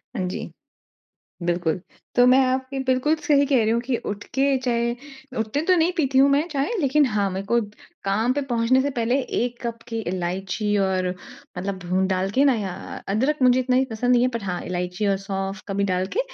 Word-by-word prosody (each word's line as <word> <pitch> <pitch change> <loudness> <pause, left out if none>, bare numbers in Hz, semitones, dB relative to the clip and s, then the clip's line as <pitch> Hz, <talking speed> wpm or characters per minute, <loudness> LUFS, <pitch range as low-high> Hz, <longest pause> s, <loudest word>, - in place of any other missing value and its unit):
हाँ 185 -5 -1
जी। 180 - -5 0.9
बिल्कुल। 175 0 0 0.4
तो 245 - +6
मैं 255 +1 +6
आपकी 260 +1 -1
बिल्कुल 260 +5 +3
सही 290 -2 +2
कह 270 -4 +3
रही 215 - +1
हूँ 230 +1 +2
कि 245 0 -1
उठ 205 0 -4
के 275 0 +2
चाय 235 -1 +1 0.5
उठते 225 +6 -1
तो 370 - +4
नहीं 335 +1 +3
पीती 275 -4 +1
हूँ 275 +1 +6
मैं 285 +4 +2
चाय 280 -1 0
लेकिन 290 -1 +3
हाँ, 210 -5 0
मेरे 190 +1 -4
को 235 +3 +2 0.4
काम 215 +5 +1
पे 285 - -1
पहुँचने 240 +2 +3
से 285 - 0
पहले 245 0 0
एक 245 -1 -2
कप 230 -1 -3
की 230 -2 -3
इलाइची 190 +3 -2
और 190 -2 +1 0.5
मतलब 190 +1 -3
भून 185 +2 +1
डाल 190 0 0
के 275 - +6
न 270 -3 +4
या 195 -3 -3 0.2
अ, - - -9
अदरक 265 +9 +1
मुझे 250 0 +5
इतना 255 0 +1
भी 265 - +3
पसंद 245 +3 0
नहीं 245 -1 +5
है - - +4
बट 230 -3 -3
हाँ, 180 -2 -3
इलाइची 180 +3 -2
और 195 -1 +2
सौंफ 195 +1 -4
कभी 200 0 -1
डाल 185 -1 0
के - - +1
235 Hz, 215 wpm, -23 LUFS, 195-265 Hz, 0.9 s, तो